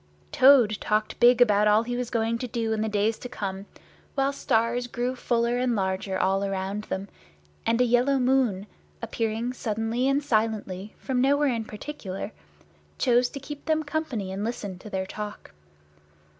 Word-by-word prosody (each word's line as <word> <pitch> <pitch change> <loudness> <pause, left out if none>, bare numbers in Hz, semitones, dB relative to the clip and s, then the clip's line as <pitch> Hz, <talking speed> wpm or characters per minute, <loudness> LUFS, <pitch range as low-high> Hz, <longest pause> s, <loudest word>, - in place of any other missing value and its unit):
Toad 250 -6 +6
talked 215 0 -1
big 245 0 +6
about 210 -3 +5
all 210 +2 +4
he 245 +1 -3
was 245 -1 -3
going 230 0 0
to 250 - -3
do 225 -1 -1
in 215 - -1
the 220 - 0
days 210 +2 0
to 250 - -7
come, 195 -3 -5 0.5
while 275 0 +1
stars 240 -2 0
grew 245 +1 -2
fuller 240 -1 0
and 250 -2 +1
larger 190 -1 -1
all 195 +1 +1
around 195 +1 -3
them, 195 +1 -4 0.6
and 230 +1 +2
a - - +5
yellow 245 +3 +3
moon, 250 -7 +2 0.4
appearing 225 +1 -2
suddenly 225 +2 -1
and 275 +2 +2
silently 215 -5 -1
from 255 -2 -1
nowhere 280 0 +3
in 225 -1 -3
particular, 210 -4 -6 0.7
came 245 -2 +4
to 255 +3 -3
keep 285 +1 -9
them 315 -1 +1
company 290 -11 -3
and 195 +2 -4
listen 205 -5 -4
to 210 - -10
their 190 -1 -2
talk. 210 - -7
230 Hz, 170 wpm, -26 LUFS, 210-250 Hz, 0.7 s, Toad